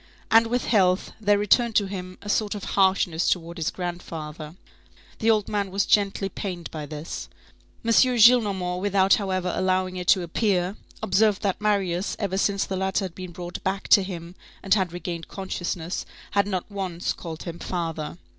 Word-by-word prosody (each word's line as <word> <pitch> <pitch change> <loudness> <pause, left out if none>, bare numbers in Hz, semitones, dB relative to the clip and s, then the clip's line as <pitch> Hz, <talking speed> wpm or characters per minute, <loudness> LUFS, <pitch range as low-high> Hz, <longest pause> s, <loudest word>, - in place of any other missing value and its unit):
And 225 +1 +6
with 245 +2 -1
health, 185 -4 +2
there 205 -1 +4
returned 220 +3 +3
to 205 - +4
him 185 -1 -6
a - - -9
sort 210 0 0
of 205 - -6
harshness 190 -3 +2
towards 170 -1 -2
his 160 - 0
grandfather. 160 -3 -6 0.6
The 225 - +2
old 215 -2 +3
man 200 -2 -1
was 195 +1 0
gently 200 -1 +2
pained 180 -2 -6
by 150 -2 -6
this. 150 +2 -6 0.6
M. 230 - +2
Gillenormand, 220 -7 +4
without 195 -1 +3
however 185 -3 0
allowing 185 0 0
it 180 -1 -5
to 185 0 +5
appear, 185 +1 0 0.3
observed 205 +2 +2
that 200 0 -1
Marius, 195 -3 0
ever 195 -2 -1
since 200 0 +1
the 190 - -3
latter 190 +1 0
had 180 - -7
been 185 0 -8
brought 175 0 -7
back 190 +1 -2
to 200 - +8
him 175 -2 -6 0.3
and 195 - +3
had 190 -4 +1
regained 175 -1 -5
consciousness, 180 -2 -4 0.3
had 200 0 +2
not 190 0 -3
once 185 -3 -2
called 160 -2 -7
him 170 -1 -7
father. 165 -3 -4
190 Hz, 175 wpm, -25 LUFS, 175-205 Hz, 0.6 s, to